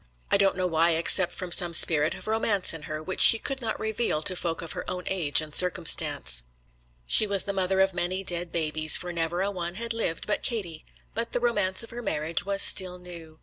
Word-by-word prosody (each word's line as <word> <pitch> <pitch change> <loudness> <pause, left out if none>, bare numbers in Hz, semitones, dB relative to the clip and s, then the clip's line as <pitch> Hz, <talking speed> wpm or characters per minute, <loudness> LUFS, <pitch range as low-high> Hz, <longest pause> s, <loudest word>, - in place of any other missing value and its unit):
I - - +4
don't 195 -1 0
know 185 - -2
why, 165 -1 +1
except 175 +2 +4
from 180 -1 -8
some 170 -1 +5
spirit 155 -1 +4
of - - -12
romance 215 -4 0
in 160 - -10
her, 155 0 -6
which 185 +4 -4
she 225 - +9
could 270 +3 -6
not 225 -2 -5
reveal 220 -7 -3
to 185 - -1
folk 170 -2 -5
of 165 - -10
her - - -7
own 180 0 -6
age 165 -6 +1
and 155 -1 -11
circumstances. 170 - +1 0.6
She 215 - +6
was 200 -2 +1
the 200 - -5
mother 190 0 -1
of 190 0 0
many 180 +2 -4
dead 175 -2 -4
babies, 155 -1 +1
for 180 -1 -7
never 170 +2 -3
a 200 - -3
one 175 -2 -7
had 230 +2 -5
lived 220 -8 -4
but 210 - -3
Katie; 180 -10 -6 0.3
but 230 +1 -5
the - - -1
romance 205 -5 -1
of 230 - -12
her 240 +1 -8
marriage 165 -4 -3
was 200 0 +2
still 185 -2 +4
new. 170 -3 -13
180 Hz, 225 wpm, -25 LUFS, 165-200 Hz, 0.6 s, she